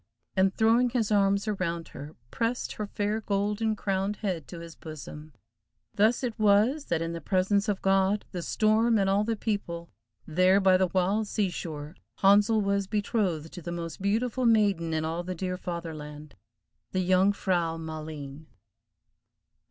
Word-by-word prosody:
and, 190 0 +2
throwing 230 +2 +4
his 230 -3 -1
arms 200 0 +2
around 170 -5 -2
her, 145 +2 -10 0.2
pressed 230 - -1
her 210 - -5
fair 210 +2 -2
golden 210 +2 0
crowned 195 0 -1
head 185 -8 -3
to 175 - -9
his 165 0 -9
bosom. 155 -1 -9 0.6
Thus 220 +5 +2
it 235 -3 -3
was, 215 +8 +3
that 165 -1 -1
in 165 0 -3
the 170 - -5
presence 200 +5 +1
of 200 -2 -2
God, 195 +1 +2
the 180 - -4
storm, 220 +5 +2
and 195 -2 +2
all 195 +2 +2
the 225 +1 -1
people—there 170 - -1
by 190 -1 +5
the 185 0 +3
the - - -18
wild 195 +4 +1
sea 200 -3 0
shore, 155 -2 -6 0.2
Handsel 205 +3 +4
was 200 -1 0
betrothed 195 -7 -1
to 175 - -8
the 170 - -6
most 170 0 -6
beautiful 235 +5 0
maiden 200 -7 +3
in 160 0 -1
all 165 +2 -2
the 180 +1 -5
dear 180 +1 -3
Fatherland,—The 150 - -8
Jung 185 +2 +4
frau 175 -5 -1
Maleen. 155 -2 -7
190 Hz, 160 wpm, -28 LUFS, 165-210 Hz, 0.6 s, by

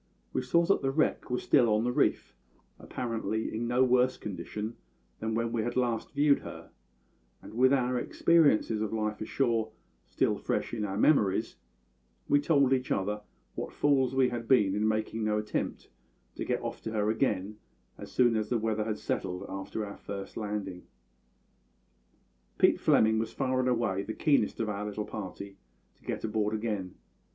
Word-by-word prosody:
We - - 0
saw 170 +7 +2
that 195 - +2
the 135 - 0
wreck 155 +3 0
was 125 - -2
still 125 -5 +4
on 105 +1 +2
the 125 - +1
reef, - - 0 0.4
apparently 115 -2 -3
in 115 +2 -2
no 125 +2 +3
worse 125 0 +3
condition 105 +3 -5 0.4
than 110 0 -2
when 115 0 -1
we 115 - 0
had 120 +2 -3
last 120 -3 -1
viewed 145 0 +4
her; - - -10 0.7
and, - - -12
with 130 +3 +4
our 125 -2 +2
experiences 130 -8 +3
of 110 - -2
life 110 -1 -2
ashore 115 -2 0 0.3
still - - 0
fresh - - -2
in 110 -3 -1
our 95 -1 -3
memories, 110 -5 +2 0.7
we 145 - +4
told 140 -3 +3
each 130 -1 -1
other 105 +2 -1 0.3
what - - -5
fools 135 -3 +2
we 130 -1 +4
had 120 -1 -5
been 105 -7 +4
in 105 +2 +1
making 110 +1 -1
no 105 0 +1
attempt 105 0 -3 0.4
to - - -5
get - - -1
off - - -5
to 110 - -5
her 105 0 +1
again 105 -3 -1 0.4
as - - -9
soon 120 -2 +3
as 110 -1 -1
the 120 - +2
weather 110 -1 -1
had 110 -1 -2
settled 90 0 -3
after 95 +3 -4
our 100 - -8
first 100 -1 -7
landing. 105 -4 -4 1.8
"Pete - - +4
Fleming 110 0 +4
was 110 0 -3
far 130 -1 0
and 130 0 +2
away 115 -6 0
the 110 +2 -5
keenest 140 -9 +2
of 115 - 0
our 105 -1 -3
little 105 0 -4
party 100 -1 -7 0.4
to - - -29
get - - -4
aboard 110 -1 0
again. 105 -4 -3
110 Hz, 175 wpm, -29 LUFS, 105-125 Hz, 1.8 s, still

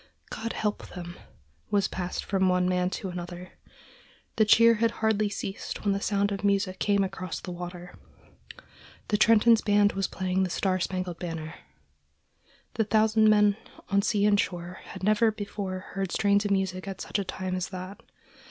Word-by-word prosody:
"God 230 +1 -4
help 210 -1 -2
them!" 175 -1 -8 0.5
was 200 -2 +2
passed 180 -1 -4
from 190 -1 +1
one 180 0 +2
man 180 0 +1
to 190 +1 -5
another. 175 0 -7 0.9
The 220 - +5
cheer 230 +2 +6
had 230 - +4 0.2
hardly 215 -1 +2
ceased 200 +1 -6
when 200 - +3
the 200 - -2
sound 200 0 +1
of 200 0 -4
music 200 -2 +1
came 200 -1 +2
across 185 -2 -4
the 180 - -7
water. 175 0 -8 1.1
The 210 - +2
Trenton's 225 +1 +5
band 205 0 +3
was 195 0 -1
playing 185 0 -1
"The 185 - 0
Star 185 +1 0
Spangled 185 -1 -3
Banner." 165 -3 -5 1.2
The 220 - +1
thousand 215 0 +3
men 210 -1 +4 0.3
on 200 -1 +3
sea 205 0 +1
and 205 -1 +4
shore 175 -1 -3
had - - -10
never 215 +2 +3
before 200 -3 -5 0.2
heard 195 -2 -2
strains 205 0 +2
of - - 0
music 190 -1 -1
at 195 -1 -6
such - - -2
a - - -1
time 185 0 -4
as 185 0 -2
that. 185 +1 -8
195 Hz, 170 wpm, -27 LUFS, 185-210 Hz, 1.2 s, cheer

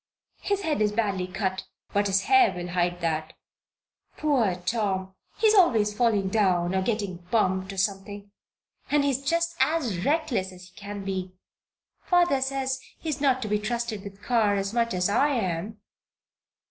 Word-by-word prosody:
His 400 -1 -1
head 310 - -1
is 210 -1 +2
badly 200 -4 -1
cut, 190 0 -3 0.3
but 205 0 +2
his 195 0 +2
hair 390 -2 +5
will 175 0 -5
hide 175 0 -1
that. 160 -1 -2 0.8
Poor 255 - +2
Tom! 190 0 -2 0.2
he - - 0
is 435 - +6
always 230 - +4
falling 210 -4 +1
down, 185 -4 +2
or 190 - +1
getting 200 -3 -2
bumped, 190 -3 +1
or 195 - -9
something. 200 +1 -3 0.6
And 295 -1 +3
he's 275 -1 0
just 335 +3 0
as 265 - +1
reckless 285 - 0
as 180 0 -13
he 180 - -29
can 205 0 -7
be. 185 -1 -3 0.7
Father 350 -7 +2
says 265 0 -1 0.2
he 325 - -6
is 290 -2 -3
not 260 -3 +2
to - - -3
be 210 0 +1
trusted 225 -1 -3
with 200 -2 -8
the 195 - -24
car 220 -5 +2
as 195 +1 -2
much 235 -3 +1
as 180 0 +1
I 280 +8 +2
am." 195 0 -3
210 Hz, 170 wpm, -26 LUFS, 190-265 Hz, 0.8 s, is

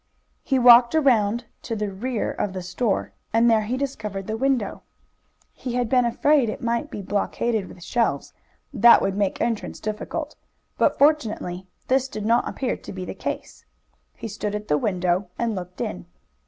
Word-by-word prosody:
He 270 - 0
walked 240 +2 +7
around 240 -6 +3 0.2
to 230 - -4
the 210 -2 -2
rear 230 +4 -2
of 200 - -3
the 185 -1 -5
store, 195 +4 -1 0.2
and 230 +2 +4
there 220 -1 +4
he 230 +5 -2
discovered 210 -8 -4
the 220 - -3
window. 255 -4 0 0.7
He 250 - -6
had 245 -2 0
been 250 -1 +3
afraid 270 +1 +3
it 215 - -5
might 235 +4 -1
be 205 - -6
blockaded 205 +1 -1
with 175 - -12
shelves, 235 +3 -1 0.4
that 235 0 +7
would 195 0 0
make 200 -2 0
entrance 230 -3 -2
difficult, 215 0 -4 0.4
but - - +3
fortunately 215 - +1 0.2
this 265 0 +2
did 215 -5 -6
not 235 +2 +2
appear 260 -2 -2
to - - -10
be 185 -1 -6
the - - -5
case. - - -6 0.5
He - - -6
stood 210 0 -4
at 210 0 -6
the 150 - +3
window 185 -1 0
and 235 -1 -1
looked 180 -2 -7
in. 85 -2 -4
220 Hz, 175 wpm, -24 LUFS, 200-245 Hz, 0.7 s, walked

